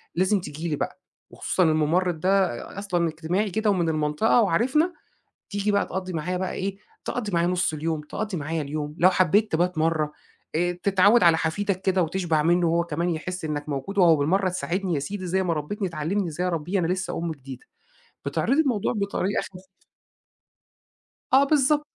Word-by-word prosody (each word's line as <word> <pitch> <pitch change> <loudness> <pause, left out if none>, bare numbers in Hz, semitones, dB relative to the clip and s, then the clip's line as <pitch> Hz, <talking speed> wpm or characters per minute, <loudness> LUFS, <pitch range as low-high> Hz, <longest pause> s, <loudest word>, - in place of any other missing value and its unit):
لازم 190 +3 +2
تيجي 155 +1 -6
لي 150 - 0
بقى - - -4 0.3
وخصوصًا 185 - 0
المُمرِّض 160 +2 +2
ده 190 +2 +3 0.3
أ - - -2
أصلًا 175 -4 0
اجتماعي 170 +6 -1
كده 215 +3 0
ومن 175 -5 +1
المنطقة 155 +10 +2
وعارفنا، 260 - +2 0.6
تيجي 205 0 -1
بقى 200 - +2
تقضّي 185 0 -4
معايا 170 +3 -2
بقى 185 0 -2
إيه، 195 +1 -3 0.3
تقضّي 215 -5 -3
معايا 170 0 +2
نُص 180 -2 +1
اليوم، 155 +1 -2
تقضّي 195 +6 -4
معايا 155 +1 -2
اليوم، 150 +1 -4
لو 185 +2 +6
حبّيت 190 +4 +2
تبات 175 +1 +1
مرّة 155 -2 +1 0.4
آآ 175 +2 +1
تتعوّد 200 +4 +4
على 170 -2 +6
حفيدك 185 +4 -1
كده 190 -1 +2
وتشبع 165 -2 0
منُّه 175 +1 +3
وهو 170 +1 +2
كمان 170 +2 -2
يحِس 180 +2 -4
إنّك 150 -1 -3
موجود 145 +9 -4
وأهو 170 -4 +6
بالمرّة 185 +7 +1
تساعدني 180 +1 -2
يا 145 - 0
سيدي 185 +6 -5
زي 190 +2 +1
ما 175 -2 0
ربِّتني 190 +6 -3
تعلِّمني 170 +5 -2
إزاي 175 +3 -2
أربّيه 175 +2 -1
أنا 175 - +1
لسّه 185 +2 -2
أم 170 0 -2
جديدة. 135 -3 -11 0.6
بتعرضي 280 +4 +2
الموضوع 245 -6 0
بطريقة 200 -1 -1
خف 185 0 -11 1.6
آه 270 +1 +7
بالضب 295 0 +3
180 Hz, 175 wpm, -25 LUFS, 160-195 Hz, 1.6 s, آه